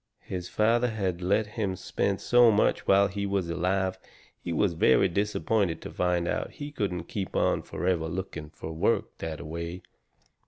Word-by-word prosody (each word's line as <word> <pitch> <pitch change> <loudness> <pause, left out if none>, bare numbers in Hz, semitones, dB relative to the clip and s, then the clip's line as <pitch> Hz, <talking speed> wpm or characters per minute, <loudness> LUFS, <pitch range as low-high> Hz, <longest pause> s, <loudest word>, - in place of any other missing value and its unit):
His 90 -1 -5
father 115 +3 +2
had 95 -5 -2
let 100 +4 +2
him 105 -2 -3
spend 95 +1 -1
so 120 -1 +6
much 105 -1 +2
whilst 100 0 +4
he 100 0 -2
was 95 -4 -1
alive 95 +2 0 0.4
he - - -4
was 85 +2 +2
very 80 - +4
disappointed 100 -1 0
to - - -7
find 90 -1 0
out - - -2
he 145 0 -7
couldn't 95 - -2
keep 95 +2 -5
on - - +2
forever 90 -3 -1
looking 85 -3 -5
fur 80 +1 -8
work 80 - 0
that 80 -2 -4
a - - -8
way. 85 +3 -5
95 Hz, 170 wpm, -28 LUFS, 85-100 Hz, 0.4 s, so